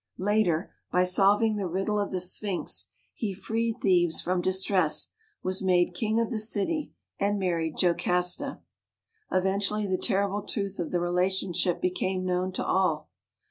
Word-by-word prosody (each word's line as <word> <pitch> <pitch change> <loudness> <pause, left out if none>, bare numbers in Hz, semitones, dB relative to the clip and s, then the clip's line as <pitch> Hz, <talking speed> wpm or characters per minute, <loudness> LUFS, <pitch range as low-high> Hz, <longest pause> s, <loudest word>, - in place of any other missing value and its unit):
Later, 190 -4 0 0.2
by 180 - +3
solving 205 +4 +3
the 195 -2 -2
riddle 195 +4 -1
of 205 - -1
the 185 - -2
sphinx, 180 +1 +2 0.2
he 205 -4 -4
freed 225 +3 -2
Thebes 175 -3 +3
from 180 0 -1
distress, 185 -3 +2 0.3
was 185 0 +2
made 180 -2 +2
king 220 +4 0
of 230 +1 -1
the 225 - -2
city, 225 +9 -1 0.3
and 205 +1 +1
married 170 -4 -1
Jocasta. 180 +8 +1 0.7
Eventually 195 +3 0
the 185 -2 -1
terrible 200 -1 0
truth 200 -1 -4
of 170 - -2
the 180 - 0
rela 175 +1 +1
tionship 185 -2 -1
became 185 0 -1
known 180 +1 -1
to - - -3
all. 180 -5 0
190 Hz, 150 wpm, -27 LUFS, 180-205 Hz, 0.7 s, by